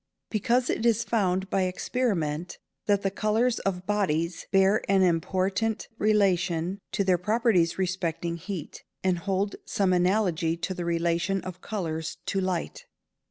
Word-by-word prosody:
_ - - -59
Because 245 +3 +2
it - - -2
is 230 -1 +3
found 190 -4 0
by 195 - +2
experiment 180 -5 -1 0.3
that 200 -1 +2
the 195 - +1
colours 225 +4 +1
of 185 -2 -2
bodies 175 -5 0
bear 195 +1 +4
an 195 -1 +5
important 190 +5 0
relation 185 -4 +2
to 200 - +1
their 185 -2 +2
properties 210 -4 +2
respecting 175 -3 -2
heat, 180 -3 -7 0.2
and 185 -2 +2
hold 195 +2 -1
some 190 -2 +1
analogy 180 -3 +2
to 185 +3 -3
the 175 -2 -4
relation 170 +3 +1
of 185 -1 -7
colours 160 -7 -3
to 195 - 0
light. 185 -3 -3
190 Hz, 145 wpm, -27 LUFS, 170-205 Hz, 0.3 s, an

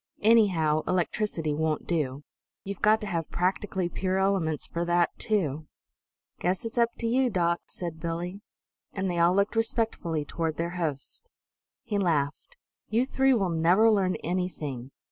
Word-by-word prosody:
Anyhow, 185 -9 +4
electricity 175 -3 0
won't 155 0 -1
do; 145 -5 -1 0.4
you've 200 0 -6
got 215 +1 +4
to - - -4
have 170 -5 -3
practically 185 0 -1
pure 185 +2 -1
elements 190 -6 0
for 170 - -3
that, 175 0 +2
too." 155 -8 0 0.7
"Guess 180 +4 -1
it's 230 +2 -3
up 235 -1 +4
to 235 - -4
you, 255 +2 +2
doc," 170 -4 +1
said 170 -3 -6
Billie. 175 +4 -4 0.5
And 190 -2 -1
they 175 - -1
all 170 +2 +4
looked 200 +3 +1
respectfully 220 -9 -1
toward 160 0 -3
their 170 +1 -2
host. 170 - -4 0.5
He 205 -3 -1
laughed. 165 - -1 0.3
"You 235 +4 +2
three 270 0 +3
will 195 -6 0
never 180 +7 +4
learn 190 -3 +2
anything. 155 -8 -3
180 Hz, 150 wpm, -27 LUFS, 160-210 Hz, 0.7 s, Anyhow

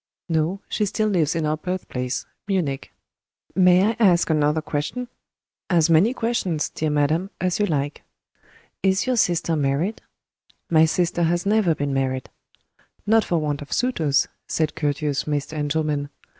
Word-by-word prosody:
"No, 165 +4 0
she 210 - -1
still 215 +2 0
lives 170 -6 +1
in 165 -2 0
our 155 +1 0
birthplace 155 -8 -3 0.2
Munich." 165 -9 -1 0.6
"May 185 +2 +5
I - - -6
ask 175 -6 +4
another 150 0 +2
question?" 160 +11 -3 0.6
"As 170 -3 +3
many 170 +9 +5
questions, 225 -10 -1
dear 155 - -2
madam, 150 +5 +1
as 180 +1 0
you 205 - +2
like." 145 -2 -2 0.8
"Is 190 0 +2
your 255 -1 +1
sister 170 -6 +1
married?" 150 +9 0 0.7
"My 160 -1 +6
sister 170 +1 0
has 175 +2 +1
never 205 -5 +3
been 145 -1 -2
married." 130 -1 -2 0.7
"Not 220 +1 +4
for 175 - 0
want 150 -2 -2
of 145 - -10
suitors," 165 - +1 0.2
said 155 -2 0
courteous 145 -1 -1
Mr. 150 0 -2
Engelman. 150 -1 -1
160 Hz, 145 wpm, -23 LUFS, 150-190 Hz, 0.8 s, My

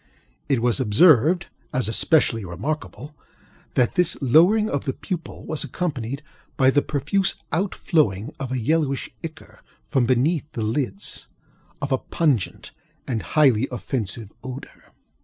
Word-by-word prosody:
It 130 -5 +2
was 120 +2 +2
observed, 155 - +5 0.3
as 130 -3 0
especially 115 -1 +2
remarkable, 145 - -5 0.6
that 125 -2 +3
this 180 -2 +2
lowering 175 - +5
of 140 -9 -2
the 135 - -1
pupil 170 0 -6
was 155 - -1
accompanied 140 -5 -3 0.3
by 130 0 +5
the 145 - +3
profuse 190 +8 0 0.2
out 190 +4 0
flowing 120 - +1
of 135 -2 -4
a 130 - 0
yellowish 140 +2 0
ichor 160 -1 -9 0.2
(from 130 -5 +1
beneath 145 +5 +1
the 115 - -3
lids) 110 -3 -2 0.6
of 140 - -2
a 130 - +2
pungent 145 - -1 0.4
and 115 -4 -1 0.2
highly 135 -5 +5
offensive 115 -4 -3
odor. 130 +1 -9
135 Hz, 135 wpm, -23 LUFS, 120-155 Hz, 0.6 s, observed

